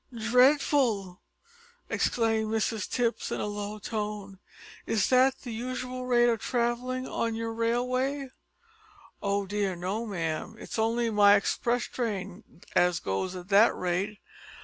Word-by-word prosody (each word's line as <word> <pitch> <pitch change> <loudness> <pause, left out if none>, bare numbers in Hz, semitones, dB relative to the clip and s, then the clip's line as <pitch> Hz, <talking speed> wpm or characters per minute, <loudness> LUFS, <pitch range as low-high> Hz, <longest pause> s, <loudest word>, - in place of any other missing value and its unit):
"Dreadful!" 240 -5 +3 0.7
exclaimed 225 -2 +1
Mrs 220 -2 -1
Tipps 240 -2 -1
in - - -2
a - - -1
low 205 0 -4
tone. 210 -2 -5 0.5
"Is 220 -3 +1
that 260 +1 +4
the 240 -3 -6
usual 255 +2 -4
rate 240 -1 +4
of 230 -2 +1
travelling 250 +1 -1
on 230 -1 -2
your 225 0 -3
railway?" 255 +4 0 0.9
"Oh 200 0 0
dear 200 -1 -1
no, 195 +7 -3
ma'am. 170 +2 -3
It's 225 - -6
only 230 +1 +1
my 205 -1 +6
express 240 +4 0
train 200 -5 -5
as 175 -1 +3
goes 95 - -2
at 180 +1 -9
that 210 +3 +5
rate. 185 +4 -2
225 Hz, 130 wpm, -28 LUFS, 200-240 Hz, 0.9 s, my